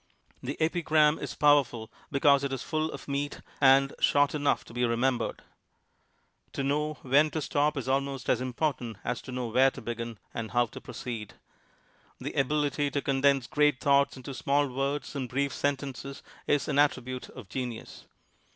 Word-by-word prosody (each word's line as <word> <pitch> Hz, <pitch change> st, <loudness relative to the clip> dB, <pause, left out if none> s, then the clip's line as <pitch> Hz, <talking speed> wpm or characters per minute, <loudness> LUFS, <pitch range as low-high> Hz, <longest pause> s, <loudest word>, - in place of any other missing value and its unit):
The 135 Hz, +3 st, -4 dB
ei>'gram 155 Hz, -2 st, +3 dB
is -, -, -5 dB
powerful 140 Hz, -6 st, +3 dB, 0.2 s
be 140 Hz, -, 0 dB
cause 140 Hz, -1 st, +5 dB
it 140 Hz, -, -1 dB
is 135 Hz, -, -3 dB
full 155 Hz, 0 st, -1 dB
of -, -, -9 dB
meat 140 Hz, +1 st, -3 dB, 0.2 s
an 135 Hz, 0 st, +6 dB
i -, -, -16 dB
short 145 Hz, 0 st, +4 dB
enough 145 Hz, -2 st, +1 dB
to -, -, -13 dB
be 120 Hz, +1 st, -1 dB
remembered. 120 Hz, +1 st, 0 dB, 1.1 s
To 140 Hz, -, -2 dB
know 150 Hz, +2 st, 0 dB
when 145 Hz, +4 st, +4 dB
to 155 Hz, -, -3 dB
stop 145 Hz, 0 st, 0 dB
is 130 Hz, -, -3 dB
almost 135 Hz, -1 st, -1 dB
as 125 Hz, -, +2 dB
important 130 Hz, -3 st, -2 dB
as 125 Hz, -, -2 dB
to -, -, -9 dB
know 125 Hz, -2 st, -3 dB
where 130 Hz, +4 st, +5 dB
to 135 Hz, -, -10 dB
begin 115 Hz, -1 st, -5 dB, 0.2 s
and 115 Hz, -1 st, -4 dB
how 120 Hz, 0 st, +2 dB
to 115 Hz, -, -11 dB
proceed. 115 Hz, -4 st, -6 dB, 0.8 s
The -, -, -5 dB
ability 145 Hz, +1 st, +1 dB
to 140 Hz, 0 st, -1 dB
condense 135 Hz, -1 st, +2 dB
great 150 Hz, -1 st, +2 dB
thoughts 140 Hz, -1 st, +3 dB
into 135 Hz, +2 st, -7 dB
small 140 Hz, +2 st, +1 dB
words 140 Hz, +2 st, -2 dB
and 130 Hz, -3 st, -3 dB
brief 140 Hz, +1 st, -1 dB
sentences 140 Hz, -1 st, -3 dB, 0.2 s
is 145 Hz, -, +2 dB
an 140 Hz, -, +1 dB
attribute 130 Hz, -3 st, 0 dB
of 125 Hz, -6 st, -11 dB
genius. 120 Hz, +2 st, -6 dB
135 Hz, 175 wpm, -29 LUFS, 125-145 Hz, 1.1 s, an